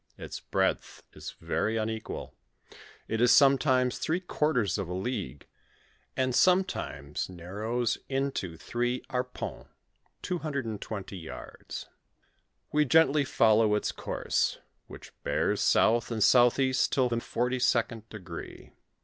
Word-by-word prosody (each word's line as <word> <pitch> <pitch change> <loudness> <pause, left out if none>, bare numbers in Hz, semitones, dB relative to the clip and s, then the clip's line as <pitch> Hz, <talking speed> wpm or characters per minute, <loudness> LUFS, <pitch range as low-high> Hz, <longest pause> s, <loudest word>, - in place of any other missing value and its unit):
Its - - -7
breadth - - -1
is - - -8
very 110 +1 -1
unequal: 110 0 -4 0.7
it 110 0 -1
is 120 - +5
sometimes 130 -2 +4
three 165 +3 0
quarters 150 - 0
of 95 - -3
a 90 - -3
league, 95 - -4 0.7
and 130 -1 +1
sometimes 120 - +1
narrows 105 +7 -2
in 135 +1 0
to 85 -9 -5
three 120 +5 -2
arpentt 125 0 -4 0.6
(220 115 - -4
yards). 80 -3 -8 0.8
"We 150 0 +3
gently 150 0 +4
follow 110 -6 +4
its 105 - -1
course, - - -1 0.3
which - - -12
be^ - - +1
south 115 +1 +3
and 110 -3 0
southeast 130 +1 +4
till 130 -2 +3
the 120 -1 -1
forty 125 +2 -1
second 115 -3 0
degree. 95 -6 -9
120 Hz, 115 wpm, -29 LUFS, 105-135 Hz, 0.8 s, is